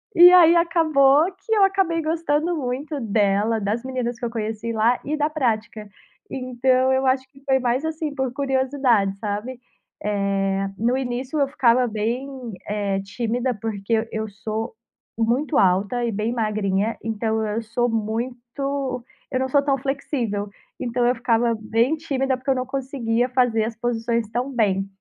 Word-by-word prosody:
E 350 Hz, 0 st, +10 dB
aí, 345 Hz, -2 st, +8 dB
acabou 315 Hz, -4 st, +4 dB
que 445 Hz, -, -3 dB
eu 420 Hz, -2 st, +4 dB
acabei 380 Hz, -4 st, +2 dB
gostando 320 Hz, +1 st, 0 dB
muito 280 Hz, +3 st, -3 dB
dela, 210 Hz, -1 st, +1 dB
das 210 Hz, +4 st, -1 dB
meninas 250 Hz, -2 st, -3 dB
que 250 Hz, -, -4 dB
eu -, -, -1 dB
conheci 225 Hz, 0 st, -3 dB
lá 230 Hz, +3 st, +2 dB
e 295 Hz, +3 st, -1 dB
da 300 Hz, 0 st, +1 dB
prática. 225 Hz, -7 st, -2 dB, 0.4 s
Então, 255 Hz, 0 st, +1 dB
eu 265 Hz, 0 st, +2 dB
acho 260 Hz, 0 st, +1 dB
que 275 Hz, -, -18 dB
foi 265 Hz, -1 st, +3 dB
mais, 255 Hz, +3 st, 0 dB
assim, 315 Hz, -2 st, -3 dB
por 265 Hz, -3 st, -2 dB
curiosidade, 260 Hz, -7 st, +1 dB
sabe. 215 Hz, +4 st, -4 dB, 0.4 s
Eh, 195 Hz, -1 st, 0 dB
no 240 Hz, +4 st, +1 dB
início 260 Hz, +3 st, -3 dB
eu 280 Hz, -, +3 dB
ficava 255 Hz, -3 st, +3 dB
bem, 230 Hz, +5 st, -2 dB, 0.4 s
eh, 205 Hz, -2 st, -1 dB
tímida, 235 Hz, +5 st, -2 dB
porque 210 Hz, -1 st, -4 dB
eu 225 Hz, 0 st, +1 dB
eu 220 Hz, 0 st, -3 dB
sou 220 Hz, +3 st, -4 dB, 0.4 s
muito 245 Hz, +7 st, +1 dB
alta 195 Hz, +6 st, +2 dB
e 235 Hz, -, -1 dB
bem 215 Hz, +2 st, -1 dB
magrinha. 215 Hz, -2 st, 0 dB
Então 220 Hz, 0 st, -1 dB
eu 215 Hz, +2 st, -2 dB
sou 235 Hz, +2 st, -1 dB
muito 245 Hz, +4 st, -3 dB, 0.3 s
eu 255 Hz, -, 0 dB
não 260 Hz, -, 0 dB
sou 285 Hz, +2 st, +4 dB
tão 275 Hz, -1 st, +1 dB
flexível. 250 Hz, -6 st, -2 dB, 0.3 s
Então 240 Hz, 0 st, 0 dB
eu 245 Hz, -, +4 dB
ficava 235 Hz, -1 st, +1 dB
bem 230 Hz, +7 st, +1 dB
tímida 270 Hz, -4 st, -1 dB
porque 260 Hz, +2 st, -6 dB
eu 270 Hz, -, +4 dB
não 255 Hz, 0 st, -2 dB
conseguia 255 Hz, -3 st, -1 dB
fazer 245 Hz, -3 st, +2 dB
as 225 Hz, 0 st, -5 dB
posições 235 Hz, -1 st, -1 dB
tão 245 Hz, +4 st, -1 dB
bem. 200 Hz, -6 st, +1 dB
245 Hz, 165 wpm, -23 LUFS, 220-270 Hz, 0.4 s, E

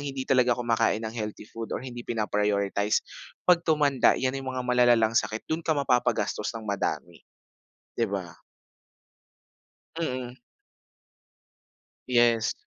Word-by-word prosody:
hindi 135 Hz, -2 st, -4 dB
talaga 125 Hz, -3 st, +3 dB
kumakain 115 Hz, -2 st, +1 dB
ng 110 Hz, -, -4 dB
healthy 105 Hz, -2 st, -5 dB
food 115 Hz, +1 st, -8 dB
or -, -, -7 dB
hindi 120 Hz, -2 st, -7 dB
pina 110 Hz, -2 st, 0 dB
prioritize, 100 Hz, 0 st, 0 dB, 0.4 s
'pag 175 Hz, -1 st, +5 dB
tumanda 145 Hz, -4 st, +3 dB
'yan 130 Hz, 0 st, 0 dB
'yong 135 Hz, -1 st, -5 dB
mga 125 Hz, -, -2 dB
malalalang 120 Hz, -3 st, +4 dB
sakit 110 Hz, -1 st, 0 dB
do'n 160 Hz, +1 st, -2 dB
ka 160 Hz, -2 st, 0 dB
mapapa-gastos 125 Hz, -6 st, 0 dB
ng 110 Hz, -, -8 dB
madami. 95 Hz, -4 st, -3 dB, 0.8 s
'Di 115 Hz, -, +1 dB
ba? 90 Hz, -4 st, -4 dB, 1.7 s
Mm. 125 Hz, -5 st, -3 dB, 1.7 s
Yes. 120 Hz, -2 st, +3 dB
120 Hz, 125 wpm, -27 LUFS, 105-130 Hz, 1.7 s, pag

